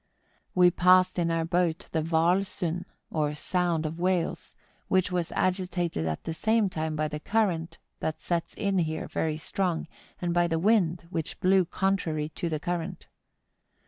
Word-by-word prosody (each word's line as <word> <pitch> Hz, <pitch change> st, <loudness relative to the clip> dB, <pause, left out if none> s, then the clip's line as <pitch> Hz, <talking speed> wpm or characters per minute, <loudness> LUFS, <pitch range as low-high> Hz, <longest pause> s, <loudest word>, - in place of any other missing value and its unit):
We 180 Hz, -1 st, +6 dB
passed 185 Hz, +1 st, +4 dB
in 170 Hz, -1 st, +1 dB
our 165 Hz, -1 st, 0 dB
boat 170 Hz, -1 st, 0 dB
the 160 Hz, -, +1 dB
Whaal 165 Hz, +3 st, +3 dB
Sund, 180 Hz, -2 st, -3 dB, 0.3 s
or 150 Hz, -2 st, 0 dB
Sound 170 Hz, 0 st, 0 dB
of 160 Hz, +2 st, -4 dB
Whales, 180 Hz, -1 st, -1 dB, 0.3 s
which 185 Hz, -1 st, +2 dB
was 175 Hz, -2 st, -1 dB
agitated 180 Hz, -, 0 dB
at 80 Hz, -1 st, -3 dB
the 165 Hz, -, -3 dB
same 220 Hz, +3 st, +2 dB
time 155 Hz, -1 st, -2 dB
by 155 Hz, 0 st, 0 dB
the 150 Hz, 0 st, -5 dB
current 180 Hz, -4 st, 0 dB, 0.2 s
that 155 Hz, 0 st, -2 dB
sets 170 Hz, 0 st, -2 dB
in 200 Hz, -2 st, 0 dB
here 160 Hz, -2 st, -2 dB
very 155 Hz, -1 st, -1 dB
strong, 170 Hz, +1 st, -2 dB, 0.3 s
and 175 Hz, -1 st, -1 dB
by 175 Hz, 0 st, +3 dB
the 165 Hz, -1 st, 0 dB
wind, 180 Hz, -3 st, +2 dB
which 165 Hz, -4 st, -3 dB
blew 185 Hz, 0 st, +4 dB
con¬ 195 Hz, +3 st, +1 dB
trary 155 Hz, -4 st, -3 dB
to 170 Hz, -, -3 dB
the 155 Hz, -2 st, -2 dB
current. 175 Hz, +2 st, -4 dB
175 Hz, 170 wpm, -28 LUFS, 160-185 Hz, 0.3 s, We